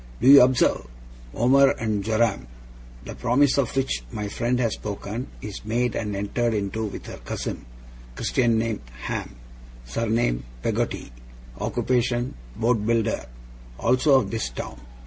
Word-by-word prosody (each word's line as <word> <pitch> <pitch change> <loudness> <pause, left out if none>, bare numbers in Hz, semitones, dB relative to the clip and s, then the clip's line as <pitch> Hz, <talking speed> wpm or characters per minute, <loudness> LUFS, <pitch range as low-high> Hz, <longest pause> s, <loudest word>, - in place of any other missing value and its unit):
Do - - +1
you 140 +1 +11
observe? 125 - +3 0.5
Omer 135 +3 +5
and 110 -3 -1
Joram. 110 - +1 0.6
The - - -6
promise 135 +3 +2
of 130 -3 0
which 135 - 0
my 105 -1 -3
friend 120 +4 0
has 115 -3 +1
spoken, 105 +4 -5 0.2
is 105 -2 -6
made 120 +2 0
and 105 -2 -2
entered 110 +3 0
into 105 +2 -2
with 105 - -7
her - - -8
cousin; - - -5 0.5
Christian 115 - +1
name, 110 -1 -1 0.2
Ham; - - -4 0.5
surname, 110 - 0 0.2
Peggotty; - - -2 0.5
occupation, 125 0 0 0.2
boat 115 -2 +1
builder; 115 - 0 0.5
also 130 +3 +4
of - - -3
this 110 - -2
town. - - -7
115 Hz, 135 wpm, -24 LUFS, 105-125 Hz, 0.6 s, you